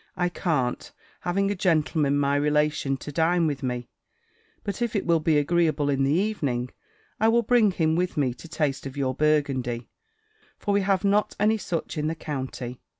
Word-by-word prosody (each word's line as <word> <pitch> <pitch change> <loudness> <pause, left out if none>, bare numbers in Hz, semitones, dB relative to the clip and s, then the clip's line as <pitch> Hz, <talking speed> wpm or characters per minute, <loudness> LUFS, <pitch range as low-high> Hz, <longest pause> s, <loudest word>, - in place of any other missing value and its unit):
"I 180 -1 +1
can't, 150 -9 -1 0.3
having 195 +3 0
a - - -1
gentleman, 155 -5 +1
my 140 0 +2
relation, 150 -1 +1
to 150 - -8
dine 165 +3 +2
with 145 -3 -1
me; 125 -2 -3 0.8
but 200 +3 -4
if 235 -2 -1
it 200 - 0
will 170 -1 +3
be 155 -1 +2
agreeable 150 -1 +2
in 135 0 +1
the 135 - +2
evening, 145 - 0 0.5
I 220 - +4
will 235 +1 +4
bring 230 -2 +4
him 160 -4 +1
with 180 0 -1
me 130 -4 +1
to 125 +7 -12
taste 150 -4 -2
of 135 +1 -9
your 130 -2 0
Burgundy: 135 -5 0 0.7
for 205 - -1
we 200 - +3
have 195 -1 +1
not 205 +1 +2
any 215 +2 +3
such 165 -3 -3
in 150 - -1
the 160 - -1
county." 130 -5 -5
155 Hz, 185 wpm, -25 LUFS, 140-180 Hz, 0.8 s, I